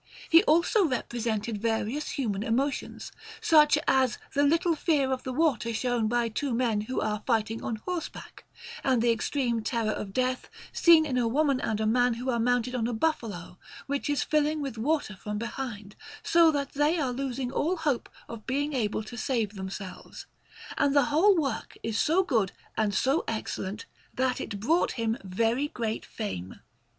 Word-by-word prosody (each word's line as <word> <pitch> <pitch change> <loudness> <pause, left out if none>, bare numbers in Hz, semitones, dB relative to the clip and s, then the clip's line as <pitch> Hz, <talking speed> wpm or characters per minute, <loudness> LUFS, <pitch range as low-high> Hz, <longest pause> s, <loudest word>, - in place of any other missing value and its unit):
He 330 0 +9
also 340 +7 +4
represented 230 -5 -2
various 230 +5 -1
human 210 -8 -2
emotions, 260 +6 -2 0.3
such 300 -2 +5
as 260 -2 +3 0.2
the 280 - +2
little 330 +4 +3
fear 290 -5 +1
of 260 -1 -1
the 260 - -5
water 255 -5 +1
shown 240 -1 0
by 240 +1 +1
two 240 +3 -2
men 230 -4 +1
who 255 +5 -3
are 210 0 -1
fighting 225 -2 0
on 225 - -2
horseback, 340 +10 -6 0.4
and 260 -3 +2
the 240 - +4
extreme 235 +1 -1
terror 225 -1 -1
of 200 -2 -5
death 255 +3 -1 0.2
seen 330 -2 +6
in 255 -4 0
a 235 - +1
woman 275 +2 +1
and 215 -1 -1
a 220 - 0
man 245 +2 +3
who 250 +3 -2
are 235 - 0
mounted 245 +1 +1
on 235 -3 0
a 240 - -2
buffalo, 220 - -2 0.3
which 280 +1 -2
is 290 -3 +1
filling 305 0 +1
with 275 -5 -4
water 265 -2 -1
from 210 +2 -5
behind, 215 -3 -6 0.3
so 335 -1 +5
that 285 -3 -1
they 295 +4 +2
are 265 -4 0
losing 260 -1 -3
all 335 +7 0
hope 295 -6 -1 0.2
of 230 -2 -9
being 285 +3 -1
able 215 -4 -1
to 230 +3 -9
save 225 -3 -1
themselves; 190 -1 -8 0.5
and 285 0 +2
the 285 - +5
whole 380 +5 +5
work 275 -8 -2
is 225 -1 -1
so 350 +5 +3
good 225 - +1 0.2
and 210 -3 0
so 270 - +2
excellent, 215 -1 -4 0.3
that 260 0 0
it 205 -3 -5
brought 320 - +2
him 230 -1 -1
very 225 +8 0
great 225 -6 -3
fame. 95 - -5
245 Hz, 175 wpm, -28 LUFS, 220-285 Hz, 0.5 s, He